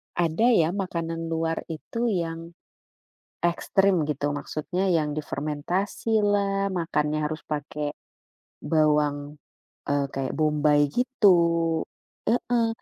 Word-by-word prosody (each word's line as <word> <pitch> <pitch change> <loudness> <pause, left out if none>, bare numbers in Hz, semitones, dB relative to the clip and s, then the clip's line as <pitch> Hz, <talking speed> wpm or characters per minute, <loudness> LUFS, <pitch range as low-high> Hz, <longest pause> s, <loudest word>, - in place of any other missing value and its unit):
ada 170 +6 +1
ya 170 -10 +4
makanan 165 -4 -3
luar 165 0 -1
itu 230 +9 -3
yang, 165 -4 -3 0.9
ekstrim 185 0 +2
gitu, 145 0 -1
maksudnya 175 +6 -2
yang 150 -3 +1
difermentasi 155 +9 -2
lah, 200 -1 +1
makannya 155 -3 0
harus 155 - -5
pake, 150 0 -3 0.7
bawang, 150 -2 +1 0.6
eee, 140 -1 +2
kayak 135 -1 -2
bombai 150 -1 +3
gitu, 240 - +4 0.9
heeh. 235 -1 +1
165 Hz, 100 wpm, -26 LUFS, 150-195 Hz, 0.9 s, ya